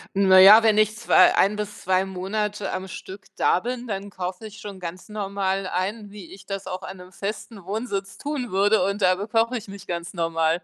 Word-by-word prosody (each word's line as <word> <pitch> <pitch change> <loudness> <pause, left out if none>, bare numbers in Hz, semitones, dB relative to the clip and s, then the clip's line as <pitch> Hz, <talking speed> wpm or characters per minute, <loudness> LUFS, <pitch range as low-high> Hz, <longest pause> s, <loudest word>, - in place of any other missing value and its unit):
Na 190 -1 +6
ja, 210 +4 +9
wenn 215 -1 +4
ich 215 0 +2
zwei 220 -5 +5
1 200 +2 +3
bis 210 0 -6
2 185 +1 +2
Monate 200 +2 -3
am 190 +1 -4
Stück 190 +1 -10
da - - +3
bin, 245 +3 -5
dann 200 -3 -5
kaufe 185 +3 -6
ich 215 +1 -13
schon 200 -2 -9
ganz 175 +1 -7
normal 195 -2 -2
ein, 205 +4 -3
wie 200 -4 -11
ich 195 0 -14
das 195 -1 -5
auch 185 0 -5
an 190 +1 -8
'nem 180 0 -13
festen 205 +1 -6
Wohnsitz 200 0 -4
tun 285 -5 -4
würde, 200 +1 +3
und 200 +1 -2
da 185 - +5
bekoche 225 +5 0
ich 220 -3 -5
mich 195 0 -10
ganz 175 0 -5
normal. 165 0 0
195 Hz, 210 wpm, -24 LUFS, 185-210 Hz, -, ja